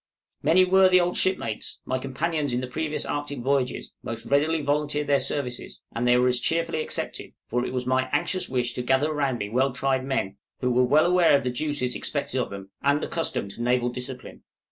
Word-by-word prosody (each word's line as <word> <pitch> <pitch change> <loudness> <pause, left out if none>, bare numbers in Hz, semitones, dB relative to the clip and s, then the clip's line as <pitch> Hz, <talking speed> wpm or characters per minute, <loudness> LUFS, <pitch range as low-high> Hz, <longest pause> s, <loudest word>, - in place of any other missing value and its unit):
Many 185 +3 +5
worthy 185 0 +5
old 175 0 0
shipmates, 150 - -1
my 130 0 -1
companions 145 +1 -2
in 125 - 0
the - - -3
previous 155 +4 -2
Arctic 145 -2 -3
voyages, 135 0 -1
most 115 - -6
readily 150 +2 +2
volunteered 150 +1 0
their 140 -1 +3
services, 125 -4 -3 0.2
and 120 +1 0
they 125 0 +5
were 125 +1 +3
as 125 -1 +3
cheerfully 165 +2 0
accepted, - - -4
for 120 +1 -1
it - - -3
was 125 -1 -2
my 130 0 +1
anxious 185 - 0
wish 125 -2 0
to - - -3
gather 130 +5 +2
round 140 -4 0
me 105 - -3
well 130 +4 +2
tried 130 +1 0
men, 100 -8 -2 0.2
who 125 -1 0
were 125 +5 +4
aware 175 -3 +5
of - - -4
the 125 - -1
duties 145 -1 -1
expected 140 -3 -2
of - - -3
them, 100 0 -9
and 140 +1 +2
accustomed 160 -11 -2
to 115 - -9
naval 125 0 +2
discipline. 125 +1 -6
135 Hz, 200 wpm, -25 LUFS, 125-150 Hz, 0.2 s, Many